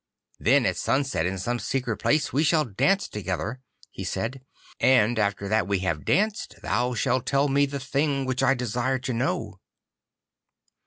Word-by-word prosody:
'Then -, -, +4 dB
at -, -, +1 dB
sunset 135 Hz, -, 0 dB
in 95 Hz, +1 st, -3 dB
some 120 Hz, +6 st, -2 dB
secret 120 Hz, 0 st, -2 dB
place 155 Hz, +1 st, +1 dB
we 145 Hz, +4 st, +2 dB
shall 155 Hz, 0 st, +3 dB
dance 195 Hz, -, +1 dB
together,' 105 Hz, +4 st, -4 dB, 0.3 s
he -, -, -7 dB
said, 130 Hz, +4 st, -3 dB, 0.4 s
'and 120 Hz, -3 st, +4 dB
after 100 Hz, -1 st, 0 dB
that 110 Hz, -2 st, +1 dB
we 100 Hz, -1 st, +1 dB
have 80 Hz, -5 st, -2 dB
danced 215 Hz, +1 st, 0 dB
thou 125 Hz, 0 st, 0 dB
shalt 125 Hz, +1 st, 0 dB
tell 140 Hz, +1 st, +2 dB
me 140 Hz, +1 st, +2 dB
the 140 Hz, 0 st, -4 dB
thing 140 Hz, +1 st, 0 dB
which 130 Hz, -1 st, -1 dB
I 135 Hz, -, +4 dB
desire 125 Hz, +2 st, -1 dB
to 130 Hz, 0 st, -4 dB
know. 120 Hz, +2 st, -2 dB
125 Hz, 165 wpm, -25 LUFS, 110-140 Hz, 0.4 s, Then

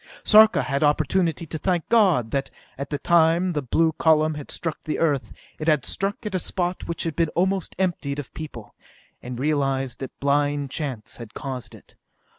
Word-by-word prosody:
Sarka 215 Hz, 0 st, +6 dB
had 140 Hz, -1 st, -1 dB
opportunity 160 Hz, +3 st, +1 dB
to 160 Hz, 0 st, -5 dB
thank 175 Hz, 0 st, 0 dB
God 185 Hz, -, +3 dB
that, 140 Hz, 0 st, -1 dB, 0.3 s
at 140 Hz, +1 st, -6 dB
the 145 Hz, -, -2 dB
time 170 Hz, +3 st, +3 dB
the 150 Hz, -, -1 dB
blue 160 Hz, +5 st, +2 dB
column 155 Hz, 0 st, +3 dB
had 150 Hz, -2 st, -8 dB
struck 165 Hz, -2 st, -4 dB
the 155 Hz, -, -3 dB
Earth, 140 Hz, -8 st, 0 dB, 0.3 s
it 155 Hz, -, -4 dB
had 150 Hz, -5 st, +3 dB
struck 200 Hz, +3 st, -2 dB
at 210 Hz, -, -2 dB
the 185 Hz, -, 0 dB
spot 180 Hz, +1 st, -3 dB
which 170 Hz, -, -3 dB
had 165 Hz, -3 st, -3 dB
been 165 Hz, 0 st, +1 dB
almost 190 Hz, +1 st, 0 dB
emptied 170 Hz, -7 st, -1 dB
of 145 Hz, -4 st, -7 dB
people, 145 Hz, -9 st, -8 dB, 0.5 s
and 125 Hz, 0 st, -6 dB
realized 135 Hz, -2 st, 0 dB
that 135 Hz, -, -8 dB
blind 145 Hz, 0 st, +1 dB
chance 130 Hz, -9 st, -4 dB
had 120 Hz, -2 st, -10 dB
caused 130 Hz, -5 st, -6 dB
it. -, -, -18 dB
155 Hz, 185 wpm, -24 LUFS, 140-170 Hz, 0.5 s, Sarka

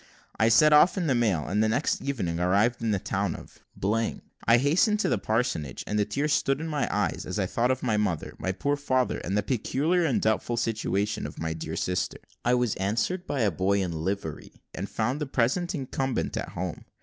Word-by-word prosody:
I 110 Hz, 0 st, +5 dB
set 155 Hz, +6 st, +6 dB
off 160 Hz, +6 st, +6 dB
in 180 Hz, -, 0 dB
the 140 Hz, -, +2 dB
mail, 105 Hz, -11 st, +1 dB
and 105 Hz, +3 st, +1 dB
the 110 Hz, -, +2 dB
next 135 Hz, +7 st, 0 dB
evening 95 Hz, -12 st, -2 dB
arrived 100 Hz, +7 st, +2 dB
at 115 Hz, -, +1 dB
the 100 Hz, -, +2 dB
town -, -, -2 dB
of. -, -, -12 dB, 0.9 s
I 115 Hz, -, +7 dB
hastened 165 Hz, -, +3 dB
to -, -, +1 dB
the -, -, +1 dB
parsonage, 110 Hz, -, -1 dB
and 105 Hz, -, -1 dB
the 105 Hz, -, +2 dB
tears 145 Hz, +8 st, 0 dB
stood 135 Hz, 0 st, +1 dB
in 160 Hz, -, -4 dB
my 150 Hz, -3 st, -1 dB
eyes -, -, -1 dB
as -, -, -4 dB
I -, -, +1 dB
thought 120 Hz, +2 st, 0 dB
of 130 Hz, 0 st, 0 dB
my 110 Hz, -4 st, +1 dB
mother, 95 Hz, -7 st, -1 dB
my 95 Hz, -, -1 dB
poor 145 Hz, +9 st, 0 dB
father, 130 Hz, -3 st, 0 dB
and 95 Hz, +3 st, -2 dB
the 105 Hz, -, +1 dB
peculiar 145 Hz, -, +1 dB
and 140 Hz, -7 st, +2 dB
doubtful 110 Hz, +2 st, 0 dB
situation 105 Hz, -3 st, -1 dB
of -, -, -11 dB
my 80 Hz, 0 st, -2 dB
dear 80 Hz, -, -5 dB
sister. 90 Hz, +1 st, -1 dB, 0.3 s
I 120 Hz, +1 st, +3 dB
was 125 Hz, -3 st, +1 dB
answered 115 Hz, -, -1 dB
by 140 Hz, -3 st, -1 dB
a 105 Hz, -3 st, +3 dB
boy 95 Hz, +4 st, +1 dB
in 90 Hz, -, -3 dB
livery, 80 Hz, 0 st, -4 dB
and 100 Hz, +2 st, -5 dB
found 125 Hz, +7 st, -1 dB
the 150 Hz, -, -1 dB
present 135 Hz, +9 st, 0 dB
incumbent 135 Hz, -3 st, -2 dB
at -, -, -3 dB
home. 90 Hz, -1 st, -5 dB
115 Hz, 215 wpm, -27 LUFS, 100-140 Hz, 0.9 s, I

